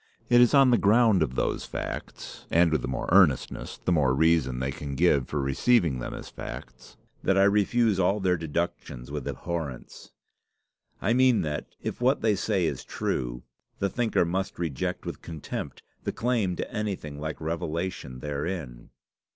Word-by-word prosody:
It 120 0 +6
is 125 +4 +5
on 135 -2 +6
the 120 - +4
ground 110 -2 +4
of 65 -5 0
those - - -1
facts, - - -7
and 85 0 +4
with 80 -4 +1
the - - -3
more 65 - -3
earnestness 85 -8 +3
the - - -2
more 70 -6 +3
reason 80 -4 +3
they 65 +1 -1
can 70 0 -6
give 70 -4 +3
for 75 - -2
receiving 70 - +2
them - - -5
as - - -8
facts, 60 0 -9 0.2
that 95 - +2
I 95 - +6
refuse 105 +1 +3
all 95 +3 +2
their 95 -2 +2
deductions 80 -6 -4
with 75 -3 -4
abhorrence. 80 -8 -5 0.9
I 110 - +3
mean 130 -1 +4
that, 75 -1 -4
if - - -4
what 130 +3 +3
they 110 -1 +3
say 100 -3 0
is 70 -5 -2
true, - - -3 0.3
the 100 - 0
thinker 115 -6 +1
must 95 +3 -2
reject 80 -7 -3
with - - -6
contempt 80 -3 -6 0.2
the - - -1
claim 115 -7 0
to - - -5
anything 95 -10 -4
like 80 0 -4
revelation 80 -4 -4
therein." 75 -4 -4
85 Hz, 165 wpm, -27 LUFS, 70-100 Hz, 0.9 s, It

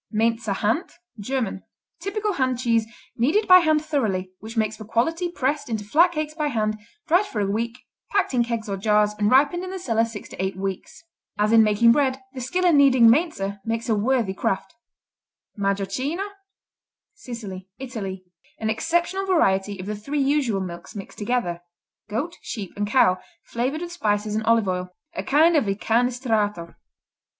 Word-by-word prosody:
Mainzer 225 -1 +1
Hand 225 - -1 0.3
German 225 -3 -2 0.4
Typical 420 +1 -2
hand 260 -5 0
cheese, 230 -3 +1 0.3
kneaded 300 - +2
by 365 0 +9
hand 310 -2 +2
thoroughly, 200 -12 -1
which 225 +2 -9
makes 215 -1 +1
for 215 - -9
quality, 325 - 0
pressed 285 -3 -2
into 220 -2 -2
flat 330 - +4
cakes 305 -1 -3
by 305 -1 -1
hand, 215 -5 -1 0.3
dried 365 +5 +3
for 220 - -4
a 205 - +1
week, 230 +4 -2 0.3
packed 395 -8 +1
in 245 -1 +3
kegs 230 -2 -3
or 200 -1 -2
jars 210 +1 +2
and 205 0 +3
ripened 290 +8 +4
in 370 - -5
the 380 - -5
cellar 230 -11 +1
six 230 -2 -6
to - - -5
eight 190 -1 -2
weeks. 195 - -5 0.3
As 210 +1 +2
in 225 0 +7
making 215 +2 +5
bread, 265 0 +2
the 260 - -6
skill 360 +9 -1
in 340 -4 +5
kneading 260 -5 +6
Mainzer 230 - 0
makes 230 +1 -3
a 220 - +3
worthy 225 -2 +1
craft. 190 0 -2 0.8
Majocchino 200 - -1 0.9
Sicily, 215 - -8
Italy 210 -8 -6 0.3
An 220 0 -1
exceptional 345 - 0
variety 200 - +2
of 185 - -6
the 210 +1 -3
three 280 +8 -3
usual 270 -7 +1
milks 175 0 -7
mixed 195 -2 -9
together: 205 -6 -1 0.5
goat, 285 +12 -3
sheep 210 -4 -6
and 205 0 -2
cow, 195 -5 +4 0.2
flavored 260 +7 -2
with 350 0 -5
spices 210 -9 -1
and 220 +1 -1
olive 230 -2 +3
oil. 180 0 -3 0.2
A 335 - -3
kind 320 +4 +4
of 290 - +3
Incanestrato. 220 -3 0
230 Hz, 170 wpm, -24 LUFS, 205-295 Hz, 0.9 s, by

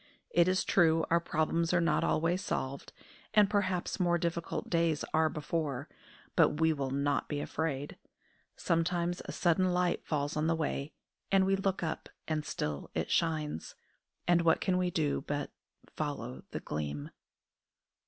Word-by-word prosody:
It 170 0 +4
is 185 0 +2
true 165 -3 +4
our 170 - +5
problems 165 +1 0
are - - +5
not 170 - +2
always 175 +4 +1
solved, 135 -4 -3 0.4
and 210 -1 +7
perhaps 190 -3 0
more 175 -1 +3
difficult 170 -1 -2
days 165 -3 +1
are 160 0 +4
before; 150 -3 -2 0.5
but 150 - +4
we 160 0 +4
will 140 -3 -2
not 140 +2 0
be 145 - -1
afraid. 145 -2 -3 0.6
Sometimes 175 +1 0
a - - -5
sudden 180 +1 +2
light 180 0 +1
falls 145 -1 -1
on 155 +1 +1
the 165 - +2
way, 150 -2 -2 0.4
and 195 -1 +5
we 195 0 +3
look 195 -2 -1
up 160 - -3 0.2
and 155 -1 -1
still 75 - -3
it - - -1
shines: 155 - 0 0.5
and 175 -1 +5
what 165 -1 +4
can 185 -1 +1
we 180 -1 +1
do 155 -4 0
but 145 0 -2 0.3
"follow 65 +1 -4
the - - -5
Gleam"? 75 -1 -4
165 Hz, 155 wpm, -32 LUFS, 150-175 Hz, 0.6 s, and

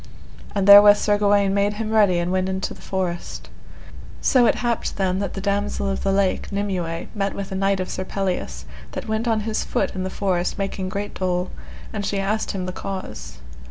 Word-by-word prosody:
And 200 -1 +1
therewith 205 0 +10
Sir 205 -1 +1
Gawaine 200 -1 +3
made 200 +1 +2
him 215 +1 -4
ready, 205 -5 +4
and 175 +1 -1
went 185 0 0
into 190 0 -2
the - - -15
forest. 180 -3 -4 0.7
So 250 -3 +4
it - - +3
happed 235 -1 -1
then 190 -1 0
that 200 -2 -3
the 195 - -4
Damosel 200 0 -1
of 195 - -2
the 195 - +1
Lake, 195 -1 0
Nimue, 185 -5 -2
met 200 -2 -2
with 195 -1 -5
a - - -3
knight 195 0 +1
of 185 - -2
Sir 185 - -4
Pelleas, 180 - -3 0.3
that - - -5
went 220 +2 -1
on 220 -2 +2
his 215 0 -1
foot - - -1
in 185 - -4
the 185 - -2
forest 185 -2 -1
making 195 -1 -3
great 200 +2 -4
dole, 180 -1 -1 0.4
and 210 -2 -3
she 200 - -1
asked 210 +3 -1
him 190 -3 -3
the 185 - -3
cause. 65 - -6
195 Hz, 205 wpm, -22 LUFS, 185-205 Hz, 0.7 s, therewith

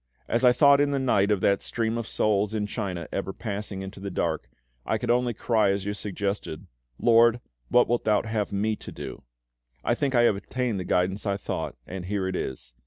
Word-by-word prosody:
As 115 +3 0
I 125 - +8
thought 140 +2 +6
in 145 - +3
the 140 - 0
night 115 -7 +2
of 105 -3 +2
that 100 -1 +3
stream 115 -1 -1
of 115 -2 -3
souls 105 0 +1
in 105 -1 0
China 95 -6 -4
ever 95 0 -2
passing 100 -2 -5
onward - - -5
into 95 +1 -8
the 100 0 -5
dark, 80 -9 -2 0.3
I 110 - 0
could 120 +2 -1
only 120 -1 +1
cry 110 -2 +2
as 100 0 -1
you 105 - -1
suggested, 100 -5 -4 0.3
'LORD, 115 0 +5 0.3
what 125 - +5
wilt 120 +1 0
Thou 105 -1 +3
have 110 -2 -2
me 105 +2 0
to - - -9
do?' - - -7 0.6
I - - +2
think 135 +1 0
I 120 - +5
have 115 - +4
obtained 120 +1 -2
the 90 - -4
guidance 95 +4 0
I 100 - +1
sought, 100 - -4
and 95 -1 -6
here 95 0 -1
it 95 - -2
is." - - -5
105 Hz, 220 wpm, -26 LUFS, 95-115 Hz, 0.6 s, I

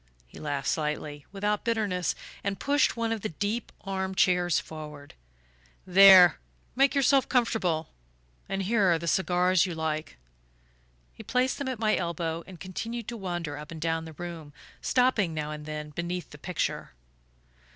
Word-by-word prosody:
He - - -14
laughed 145 -3 -3
slightly, 150 -2 -2
without 205 +1 -1
bitterness, 210 -6 0 0.3
and 195 -1 -2
pushed 285 0 +2
one 230 -1 -1
of 225 -2 -2
the 215 - -2
deep 205 +8 -3
arm 190 -1 -3
chairs 180 -3 +3
forward. 150 -2 -9 0.7
"There: 185 -2 +8 0.4
make 275 +2 +3
yourself 275 0 +3
comfortable 195 -10 +1 0.6
and 195 0 -1
here 200 -2 +3
are 170 - +3
the 170 +1 -6
cigars 180 0 +3
you 175 - -4
like." 155 - -3 1.0
He - - -11
placed 255 +1 0
them 280 - -3
at 260 -2 -2
my 215 -1 +2
elbow 170 -1 -2
and 185 -3 -11
continued 225 +6 -5
to 235 - -5
wander 175 -7 -4
up 150 0 -9
and 165 - -8
down 165 0 -1
the 160 - -9
room, 165 -2 -8 0.3
stopping 240 -10 +2
now 150 0 -3
and 150 0 -7
then 150 0 -5
beneath 170 +3 -4
the 150 - -12
picture. 180 +2 -3
180 Hz, 160 wpm, -28 LUFS, 160-210 Hz, 1.0 s, There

